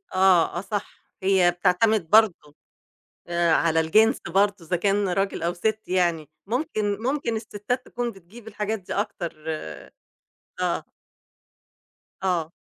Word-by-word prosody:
آه، 185 -3 +4
آه، 175 - -2
صح، 205 0 -5 0.2
هي 190 -2 +4
بتعتمد 180 +1 +2
برضه 200 -9 +3 0.7
آآ 170 -1 +1
على 165 0 +3
الجنس 215 - +4
برضه 200 +3 +2
إذا 180 - 0
كان 200 +3 +1
رجل 195 0 -1
أو 170 +1 0
ست 215 +5 -1
يعني 170 -5 0 0.2
ممكن، 215 -5 -1
ممكن 255 -3 -1
الستات 220 +3 -4
تكون 240 -1 -3
بتجيب 200 +4 -15
الحاجات 210 0 -3
دي 180 - -7
أكتر 190 -4 -3 1.3
آه. - - -1 1.4
آه. 170 -4 0
195 Hz, 125 wpm, -24 LUFS, 175-220 Hz, 1.4 s, آه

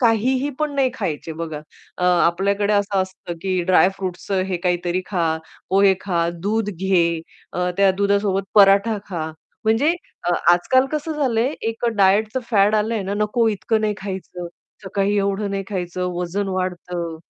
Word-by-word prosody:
काहीही 255 +4 +2
पण 305 -1 -1
नाही 270 -2 +2
खायचे 165 - -3
बघा 160 -2 -5 0.4
अ, 180 - 0
आपल्याकडे 190 +4 +2
असं 200 -1 +1
असतं 185 -2 -7
की 185 -1 0
ड्रायफ्रुट्सचं 185 0 +1
हे 180 - 0
काहीतरी 175 0 0
खा, 165 -5 0 0.3
पोहे 195 0 +5
खा, 170 -4 0
दूध 210 +2 0
घे, 170 -3 +1 0.3
अ, 180 0 -1
त्या 195 -1 +5
दुधासोबत 200 -1 +1
पराठा 200 +1 +5
खा. 160 -4 -3 0.3
म्हणजे 225 +9 +3 0.3
अ, 175 - +1 0.2
आज-काल 260 +10 +3
कसं 305 +1 -2
झालंय 260 -2 0
एक 225 +1 -4
अ, - - +4
डायटचं 210 +5 +3
फॅड 205 -1 +4
आलंय 215 0 0
ना, 195 +1 -3
"नको 210 +3 +1
इतकं 220 +1 0
नाही 210 -1 +1
खायचं, 190 -2 -6 0.4
सकाळी 200 +1 0
एवढं 200 +1 -1
नाही 195 0 -2
खायचं, 180 -2 -3
वजन 190 +3 -2
वाढतं." 180 -2 -3
195 Hz, 155 wpm, -21 LUFS, 180-215 Hz, 0.4 s, पोहे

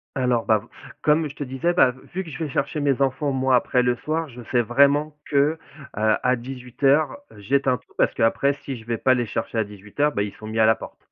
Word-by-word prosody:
Alors, 125 -3 +1
bah, 110 -1 +3
v 105 - -14 0.3
comme 155 +1 +2
je 140 - -7
te - - -7
disais, 135 +6 -1
bah, 125 -7 +4 0.2
vu 185 +2 -2
que 175 - -12
je 145 - -8
vais 150 - -5
chercher 140 +3 -2
mes 140 -2 +1
enfants, 135 +1 +1
moi, 130 -1 +3
après 125 +1 +2
le 125 0 +1
soir, 160 +4 -2
je 125 -2 -11
sais 125 - +3
vraiment 140 +6 +3
que, - - -14 0.6
heu, 110 +1 +2
à 125 0 +2
18:00, 135 +4 0 0.2
j'éteins 130 +4 +1
tout. - - -28
Parce - - +2
qu'après, 125 +5 +2
si 140 -1 -7
je 110 - -12
vais 115 0 -2
pas 130 - +3
les 120 -1 0
chercher 115 - -4
à 110 - +2
18:00, 105 +9 -2
bah, 100 - 0
ils 100 -1 -5
sont 110 - -11
mis 110 +1 -4
à 110 - +5
la 110 - +5
porte. - - -11
130 Hz, 245 wpm, -23 LUFS, 115-140 Hz, 0.6 s, à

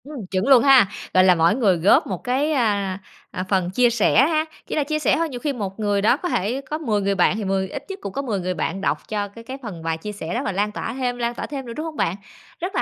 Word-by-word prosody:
Ừm, 275 -7 -8
chuẩn 190 +4 0
luôn 265 -4 +7
ha, 270 -6 +7 0.3
gọi 185 - +6
là, 185 -1 +6
mỗi 165 +4 +3
người 205 -8 +3
góp 170 +5 +4
một 185 -4 -5
cái, 265 +5 0
a, 200 -8 0 0.3
à, 185 - -3
phần 185 -3 +1
chia 240 +6 +3
sẻ 235 +2 +4
ha. 315 -1 +1 0.2
Chỉ - - -3
là 300 - +2
chia 305 +2 -2
sẻ - - +2
thôi, 330 0 0
nhiều 250 -3 -6
khi 285 +3 -2
một 200 -4 -5
người 205 -2 +1
đó 225 +5 +4
có 355 - -4
thể 235 - -1
có 290 +3 -5
10 225 -10 -1
người 200 0 0
bạn 185 +1 +3
thì 215 - -3
mười 190 0 -1
ít - - -6
nhất 390 +1 -6
cũng 195 - -6
có 275 - -2
10 225 -8 -2
người 185 0 -2
bạn 185 +3 -3
đọc - - -1
cho 205 -1 -2
cái 230 +3 -13
cái 260 +3 -7
phần 180 -8 -7
bài 165 0 -1
chia 210 +6 -6
sẻ 180 -5 -6
đó - - -1
và - - 0
lan 205 +2 -1
tỏa 225 - -4
thêm, 250 -1 -2
lan 240 0 -2
tỏa - - -4
thêm 275 -2 -6
nữa, 235 - -7
đúng 310 - -4
hông 320 -1 -6
bạn? 170 - 0 0.4
Rất 360 +3 -4
là - - +2
215 Hz, 300 wpm, -22 LUFS, 195-270 Hz, 0.4 s, luôn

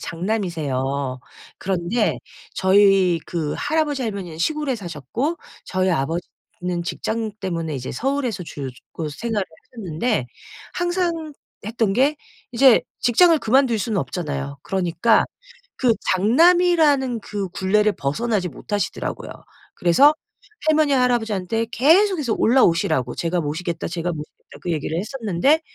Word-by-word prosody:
장남이세요. 145 - -2 0.4
그런데 190 +4 0 0.4
저희 190 -2 +4
그 160 -4 -2
할아버지, 295 -2 0
할머니는 195 -8 -5
시골에 300 - 0
사셨고 205 - -3 0.3
저희 185 0 0
아버지는 175 +3 -3
직장 220 +4 -3
때문에 165 -5 -3
이제 130 -1 -5
서울에서 260 -8 -1
주로 140 -4 -6 0.2
곧 155 -2 -4
생활을 215 +4 -2 0.3
하셨는데 200 - -2 0.5
항상 350 -3 -1 0.3
했던 225 -3 0
게 275 +7 +2 0.4
이제 250 0 +6 0.2
직장을 325 +8 +5
그만둘 250 -2 +2
수는 210 -1 -1
없잖아요. 140 -1 -4
그러니까 190 +3 +2 0.5
그 245 -3 +3 0.2
장남이라는 290 - +4
그 200 -2 -4
굴레를 210 +3 +2
벗어나지 190 +6 -1
못하시더라고요. 205 +8 -4 0.4
그래서 275 - +5 0.5
할머니, 310 -2 +3
할아버지한테 225 -4 +1
계속해서 310 - +3
올라오시라고 165 - +2
"제가 170 +1 -1
모시겠다, 165 +2 -3
제가 170 +1 -3
모시겠다." 150 -1 -10
그 175 - -2
얘기를 160 +1 -2
했었는데 235 - +1
205 Hz, 320 characters per minute, -22 LUFS, 170-255 Hz, 0.5 s, 이제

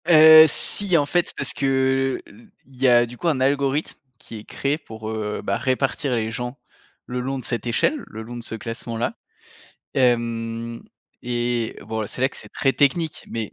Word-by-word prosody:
Heu, 160 -1 +9
si 185 +4 +3
en 145 - +2
fait 175 +4 0
parce - - -2
que, 135 -1 +1
heu, - - -17
l 105 +4 -18 0.2
il 130 -1 -18
y 135 - +5
a 120 -1 +6
du 120 +1 -11
coup 175 - -3
un 150 -5 +1
algorithme 140 +2 0 0.2
qui 115 - -10
est - - -12
créé 140 +2 -2
pour, 110 -7 -9
heu, 105 -1 -3
bah, 100 - -1
répartir 130 0 0
les 110 -1 -2
gens 125 +2 -5 0.5
le 125 0 -4
long 135 +2 -3
de - - -10
cette 120 0 -4
échelle, 265 - +1
le 110 - -8
long 120 +2 -8
de 120 - -6
ce 115 - -5
classement-là. 115 - -4 0.8
Hem, 115 -2 0 0.4
et 120 -1 -2
bon 110 +2 -4
là, 110 - -2
c'est 125 - -6
là 130 - +4
que - - -15
c'est - - -11
très 135 - +1
technique 145 +4 0
mais 110 -2 -4
125 Hz, 200 wpm, -22 LUFS, 115-140 Hz, 0.8 s, Heu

